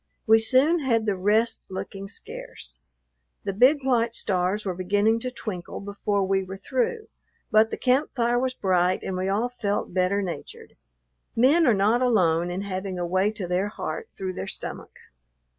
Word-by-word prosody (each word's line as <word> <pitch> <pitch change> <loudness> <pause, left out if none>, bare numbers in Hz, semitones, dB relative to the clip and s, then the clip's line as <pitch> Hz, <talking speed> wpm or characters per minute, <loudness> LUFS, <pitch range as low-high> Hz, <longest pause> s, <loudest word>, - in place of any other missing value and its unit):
We 225 0 +6
soon 265 +9 +4
had 230 -6 +1
the 205 -2 +1
rest 215 +5 +1
looking 195 +1 -6
scarce. - - -9 0.6
The 195 - -2
big 260 +7 +4
white 235 -3 +1
stars 190 +2 0
were 190 - -1
beginning 205 +5 +1
to 255 - -3
twinkle 195 -8 -6
before 200 0 -1
we 190 0 +1
were 190 +1 -7
through, 280 - -1 0.5
but 215 +1 +5
the - - -4
camp 260 +4 +2
fire 240 -1 +2
was 255 0 -1
bright, 185 -3 +1
and 190 - -3
we 185 +1 -1
all 210 +5 +1
felt 205 -6 -2
better 190 +2 +1
natured. 175 -3 -7 0.6
Men 290 +8 +5
are 235 - +5
not 215 +5 +3
alone 175 -9 +2
in 180 +2 -3
having 190 -1 -4
a 175 - -2
way 185 +3 +2
to 210 -3 -5
their 180 +3 0
heart 445 - -5
through 190 -1 -3
their 95 - -5
stomach. - - -7
205 Hz, 175 wpm, -25 LUFS, 185-240 Hz, 0.6 s, We